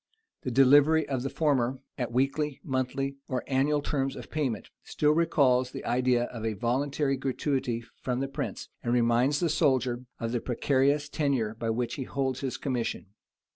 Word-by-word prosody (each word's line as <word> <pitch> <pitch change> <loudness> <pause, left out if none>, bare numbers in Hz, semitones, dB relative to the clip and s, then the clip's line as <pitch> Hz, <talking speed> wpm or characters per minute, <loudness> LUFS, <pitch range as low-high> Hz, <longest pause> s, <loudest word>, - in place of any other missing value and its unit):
The - - -3
delivery 145 +4 +5
of 135 -3 -1
the 135 - -2
former, 135 -5 +1 0.2
at 125 - -2
the 120 - -11
weekly, 140 +2 0
monthly, 135 +1 -2
or 130 - -2
annual 140 +2 +1
terms 135 -3 -1
of - - -10
payment, 135 -8 -2
still 150 0 +1
recalls 140 -6 +3
the - - -8
idea 125 -1 +2
of 120 -2 -6
a 110 -1 0
voluntary 135 +5 0
gratuity 130 -2 -1 0.2
from 125 -1 -1
the 135 - -1
prince, 135 - -5
and 120 - -1
reminds 120 +4 +3
the 175 - +1
soldier 130 -6 +1
of 115 0 -2
the 120 -1 -1
precarious 140 +3 +1
tenure 135 -8 0
by 115 0 -3
which 120 +2 -1
he - - -3
holds 130 -1 -2
his 135 -2 -3
commission. 120 -6 -3
130 Hz, 175 wpm, -28 LUFS, 120-140 Hz, 0.2 s, delivery